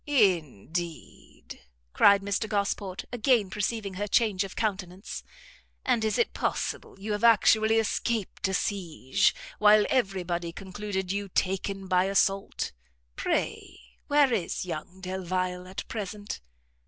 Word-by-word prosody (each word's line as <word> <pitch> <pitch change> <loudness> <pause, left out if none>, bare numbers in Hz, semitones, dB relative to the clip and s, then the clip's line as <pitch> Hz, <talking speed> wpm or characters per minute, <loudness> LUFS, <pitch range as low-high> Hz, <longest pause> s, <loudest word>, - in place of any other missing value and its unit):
"Indeed?" 170 - -1 0.3
cried 200 -1 +6
Mr 200 +2 -1
Gosport, 200 -2 -1
again 235 -5 +2
perceiving 210 -1 -2
her 205 +3 -3
change 210 -3 +2
of 195 - -8
countenance; 195 -3 -3 0.6
"and 245 -4 +2
is 220 - +1
it 470 - +1
possible - - -3
you 210 +2 -4
have 210 +2 -2
actually 220 -1 +5
escaped 225 -2 -1
a 190 - -2
siege, 175 -10 +1 0.2
while 210 0 +6
every 195 -8 +1
body 170 -1 -2
concluded 190 0 -4
you 200 0 -2
taken 195 +1 -1
by 185 0 +3
assault? 195 0 +1 0.4
Pray - - -2 0.3
where 285 -3 +4
is 190 -3 -1
young 180 +2 -6
Delvile 185 -1 -2
at 190 +1 -6
present?" 205 -1 -5
195 Hz, 125 wpm, -28 LUFS, 185-215 Hz, 0.6 s, cried